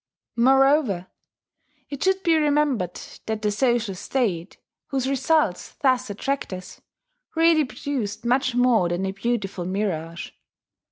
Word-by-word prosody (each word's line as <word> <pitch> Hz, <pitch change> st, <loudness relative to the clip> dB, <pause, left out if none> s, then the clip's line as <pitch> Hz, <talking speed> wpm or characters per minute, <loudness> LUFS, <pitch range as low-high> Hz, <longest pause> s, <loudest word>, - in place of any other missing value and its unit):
Moreover, 265 Hz, -, +3 dB, 0.9 s
it 280 Hz, -1 st, -4 dB
should 380 Hz, 0 st, +1 dB
be 335 Hz, -2 st, +4 dB
remembered 290 Hz, -, +1 dB, 0.3 s
that 220 Hz, -1 st, -3 dB
the 210 Hz, -, +2 dB
social 235 Hz, -2 st, +1 dB
state, 190 Hz, -3 st, -2 dB, 0.3 s
whose 265 Hz, -2 st, -1 dB
results 275 Hz, -, +1 dB
thus 255 Hz, -3 st, +1 dB
attract 270 Hz, +7 st, -3 dB
us, 185 Hz, 0 st, -9 dB, 0.5 s
really 325 Hz, -2 st, +4 dB
produced 255 Hz, -5 st, -4 dB
much 255 Hz, +1 st, +1 dB
more 245 Hz, -8 st, +3 dB
than 175 Hz, +2 st, -1 dB
a 190 Hz, -, -1 dB
beautiful 200 Hz, -2 st, -2 dB
mirage. 170 Hz, -4 st, -3 dB
240 Hz, 120 wpm, -24 LUFS, 195-275 Hz, 0.9 s, be